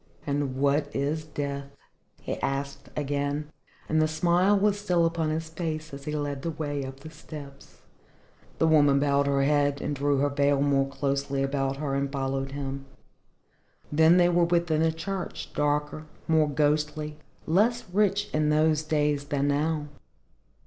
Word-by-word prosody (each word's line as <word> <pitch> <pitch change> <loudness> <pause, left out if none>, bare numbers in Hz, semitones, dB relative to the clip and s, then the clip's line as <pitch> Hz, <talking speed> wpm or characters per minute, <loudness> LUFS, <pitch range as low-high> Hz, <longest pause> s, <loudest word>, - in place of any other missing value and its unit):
"And 140 -2 -1
what 140 +2 +1
is 145 +3 -1
Death?" 140 -2 -4 0.5
he - - -4
asked 140 0 -3
again, 145 +1 -2 0.4
and 155 0 +2
the 155 - +3
smile 175 +5 +3
was 205 0 +2
still 180 -4 +2
upon 165 -1 0
his 160 +1 -2
face 155 -2 -4
as 140 0 -8
he 150 - -3
led 145 -2 -3
the 165 - -2
way 145 -3 -3
up 135 +1 -8
the 155 +2 -10
steps. 150 -3 -11 0.8
The - - +2
woman 145 -3 +5
bowed 140 0 +2
her 140 -1 +2
head 145 0 +2
and 145 - -2
drew 140 +1 +1
her 145 +1 +2
veil 140 0 +2
more 140 -1 +2
closely 140 0 -1
about 135 0 -1
her 140 -1 -2
and 140 0 -1
followed 135 0 -2
him. 135 -1 -5 1.0
Then 160 +3 +5
they 175 -1 +5
were 175 -1 +3
within 170 -2 +1
the 160 0 +3
church, 185 +3 -5
darker, 150 +1 -1 0.2
more 155 -2 +3
ghostly, 150 +1 0 0.3
less 220 +8 +2
rich 205 0 +2
in 155 0 +2
those 155 0 +3
days 150 -2 0
than 145 -1 0
now. 150 +1 0
150 Hz, 160 wpm, -27 LUFS, 140-160 Hz, 1.0 s, woman